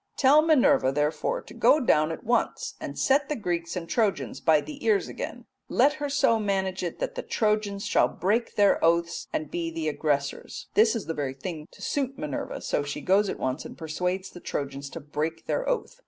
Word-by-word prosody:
Tell 280 Hz, +3 st, +6 dB
Minerva, 300 Hz, -, +4 dB
therefore, 150 Hz, -, -1 dB
to -, -, -13 dB
go 305 Hz, -, +4 dB
down 155 Hz, -, +3 dB
at 165 Hz, -, -6 dB
once 240 Hz, +2 st, 0 dB
and -, -, -6 dB
set 275 Hz, +1 st, +2 dB
the 300 Hz, -, 0 dB
Greeks 175 Hz, -6 st, -2 dB
and 170 Hz, -2 st, -4 dB
Trojans 165 Hz, -, 0 dB
by 160 Hz, -1 st, +5 dB
the 295 Hz, -, -8 dB
ears 420 Hz, -3 st, +2 dB
again, -, -, -6 dB, 0.2 s
and -, -, -6 dB
let 290 Hz, -, +5 dB
her 290 Hz, -, -1 dB
so 230 Hz, -5 st, +3 dB
manage 190 Hz, -2 st, -1 dB
it 175 Hz, -2 st, -3 dB
that -, -, -3 dB
the -, -, -4 dB
Trojans 210 Hz, -2 st, 0 dB
shall -, -, +3 dB
break 220 Hz, +6 st, -1 dB
their 205 Hz, -1 st, +4 dB
oaths 170 Hz, +1 st, +1 dB
and 155 Hz, -1 st, -3 dB
be 170 Hz, -1 st, -2 dB
the 165 Hz, -1 st, -3 dB
aggressors.'" 145 Hz, -2 st, -2 dB
This 220 Hz, +2 st, +4 dB
is 225 Hz, -, -3 dB
the 165 Hz, -, -3 dB
very 140 Hz, -3 st, -3 dB
thing 155 Hz, +1 st, -6 dB
to -, -, -13 dB
suit 270 Hz, -2 st, -1 dB
Minerva, 150 Hz, -3 st, -4 dB
so -, -, 0 dB
she 145 Hz, 0 st, -5 dB
goes 195 Hz, +2 st, +3 dB
at -, -, -3 dB
once 130 Hz, +2 st, -2 dB
and -, -, -10 dB
persuades 180 Hz, +4 st, -3 dB
the 175 Hz, -, -10 dB
Trojans 140 Hz, -3 st, -4 dB
to 165 Hz, -, -7 dB
break 155 Hz, +2 st, -4 dB
their -, -, -1 dB
oath. -, -, -2 dB
180 Hz, 210 wpm, -27 LUFS, 155-230 Hz, 0.2 s, Tell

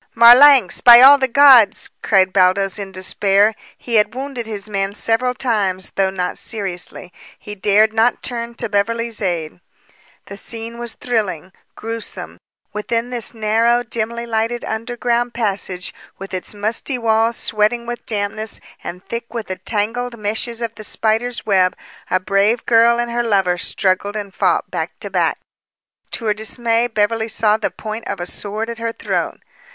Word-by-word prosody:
"Marlanx! 245 Hz, 0 st, +7 dB
By 240 Hz, -1 st, +9 dB
all 280 Hz, +2 st, +9 dB
the 265 Hz, -, +1 dB
gods!" 255 Hz, -5 st, +5 dB
cried 190 Hz, -2 st, +2 dB
Baldos 195 Hz, +1 st, +2 dB
in 195 Hz, -1 st, -6 dB
despair. 195 Hz, +3 st, +2 dB, 0.2 s
He 235 Hz, -2 st, -1 dB
had 210 Hz, +3 st, +2 dB
wounded 260 Hz, -3 st, -5 dB
his 210 Hz, -2 st, -5 dB
man 195 Hz, -1 st, -2 dB
several 250 Hz, +4 st, 0 dB
times, 200 Hz, -7 st, -1 dB
though 195 Hz, -1 st, +1 dB
not 180 Hz, -1 st, -4 dB
seriously. 185 Hz, -3 st, -4 dB, 0.2 s
He 210 Hz, -, -9 dB
dared 210 Hz, +2 st, +2 dB
not 225 Hz, +2 st, +1 dB
turn 235 Hz, -1 st, -4 dB
to 235 Hz, -, -3 dB
Beverly's 230 Hz, +2 st, -1 dB
aid. 170 Hz, -4 st, -3 dB, 0.7 s
The 200 Hz, -, -10 dB
scene 230 Hz, +2 st, -8 dB
was 240 Hz, -1 st, -6 dB
thrilling, 200 Hz, -7 st, -3 dB, 0.2 s
grewsome. 230 Hz, 0 st, -6 dB, 0.3 s
Within 230 Hz, +3 st, -3 dB
this 240 Hz, -1 st, -2 dB
narrow, 230 Hz, +2 st, +1 dB
dimly 235 Hz, 0 st, -4 dB
lighted 230 Hz, +1 st, -2 dB
underground 240 Hz, +1 st, -2 dB
passage, 195 Hz, -5 st, -2 dB, 0.2 s
with 195 Hz, 0 st, -10 dB
its 185 Hz, +3 st, -4 dB
musty 220 Hz, +6 st, -1 dB
walls 225 Hz, 0 st, +1 dB
sweating 225 Hz, +2 st, 0 dB
with 240 Hz, 0 st, -6 dB
dampness 215 Hz, 0 st, -2 dB, 0.2 s
and 180 Hz, +2 st, -8 dB
thick 235 Hz, 0 st, -6 dB
with 230 Hz, -3 st, -6 dB
the 185 Hz, -, -3 dB
tangled 235 Hz, +3 st, -2 dB
meshes 225 Hz, +3 st, -3 dB
of 230 Hz, -1 st, -4 dB
the 215 Hz, -, -11 dB
spider's 225 Hz, +3 st, -1 dB
web, 185 Hz, -3 st, +2 dB, 0.3 s
a 185 Hz, -, +2 dB
brave 200 Hz, +5 st, +1 dB
girt 235 Hz, 0 st, +4 dB
and 240 Hz, 0 st, -2 dB
her 240 Hz, 0 st, 0 dB
lover 195 Hz, -6 st, +1 dB
struggled 200 Hz, +2 st, -1 dB
and 205 Hz, -2 st, -6 dB
fought -, -, 0 dB
back -, -, -5 dB
to -, -, -6 dB
back. -, -, 0 dB, 0.8 s
To 230 Hz, -, -4 dB
her 210 Hz, -, +2 dB
dismay, 230 Hz, +2 st, 0 dB
Beverly 220 Hz, 0 st, 0 dB
saw 215 Hz, -1 st, +1 dB
the 220 Hz, -, -2 dB
point 220 Hz, +1 st, -7 dB
of -, -, -4 dB
a 175 Hz, -, -4 dB
sword 210 Hz, +4 st, -4 dB
at 235 Hz, 0 st, -7 dB
her 230 Hz, 0 st, -2 dB
throat. -, -, -3 dB
220 Hz, 160 wpm, -18 LUFS, 200-235 Hz, 0.8 s, By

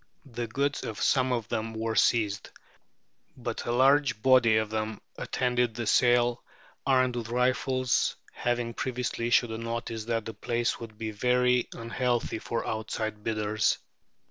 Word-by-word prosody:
The 120 Hz, 0 st, -3 dB
goods 140 Hz, +5 st, -1 dB
of 110 Hz, -, -5 dB
some 130 Hz, -2 st, +2 dB
of 120 Hz, -4 st, -1 dB
them 110 Hz, -1 st, -3 dB
were 110 Hz, 0 st, -2 dB
seized, 105 Hz, -3 st, +2 dB, 0.9 s
but 120 Hz, -2 st, -4 dB
a -, -, +1 dB
large 135 Hz, 0 st, +4 dB
body 120 Hz, -2 st, +5 dB
of 110 Hz, -1 st, -1 dB
them 110 Hz, -1 st, -2 dB, 0.2 s
attended 125 Hz, -2 st, 0 dB
the 120 Hz, -1 st, -3 dB
sale 120 Hz, +1 st, +3 dB, 0.4 s
armed 130 Hz, -2 st, +3 dB
with 115 Hz, -1 st, -4 dB
rifles, 130 Hz, +1 st, +1 dB, 0.2 s
having 120 Hz, -1 st, -1 dB
previously 125 Hz, -1 st, -2 dB
issued 120 Hz, -1 st, +3 dB
a 110 Hz, -, -4 dB
notice 115 Hz, -1 st, -4 dB
that 115 Hz, -2 st, -1 dB
the 115 Hz, -, -5 dB
place 120 Hz, +1 st, -1 dB
would 110 Hz, -2 st, -9 dB
be 110 Hz, 0 st, -4 dB
very 125 Hz, +2 st, +2 dB
"unhealthy" 120 Hz, 0 st, -1 dB
for 115 Hz, -, -3 dB
outside 110 Hz, -1 st, -3 dB
bidders. 110 Hz, -1 st, +1 dB
120 Hz, 145 wpm, -28 LUFS, 110-125 Hz, 0.9 s, body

